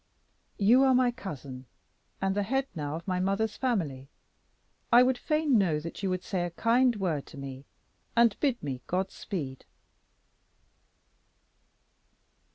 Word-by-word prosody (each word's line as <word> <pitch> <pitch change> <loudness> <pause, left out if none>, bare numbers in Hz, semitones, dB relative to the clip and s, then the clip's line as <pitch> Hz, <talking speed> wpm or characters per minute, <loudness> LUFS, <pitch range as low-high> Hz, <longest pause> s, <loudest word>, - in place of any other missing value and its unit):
"You 225 +6 +5
are 265 -1 +5
my 250 -1 +4
cousin, 140 - -8 0.5
and 195 0 0
the 205 - +1
head 265 +6 0
now 150 -1 -4
of 165 +3 -8
my 185 -1 0
mother's 195 +3 0
family. 160 - -2 0.8
I 240 +1 +8
would 260 0 +2
fain 305 -2 +2
know 165 -6 +2
that 165 +4 -7
you 195 - 0
would 185 0 -2
say 185 -3 -2
a 175 - -2
kind 235 +7 +2
word 170 -8 -2
to - - -12
me, 135 0 -8 0.5
and 235 -2 +5
bid 270 -5 0
me 130 -3 -4
'God 185 +2 -1
speed.'" 140 -10 -5
195 Hz, 145 wpm, -29 LUFS, 150-240 Hz, 0.8 s, I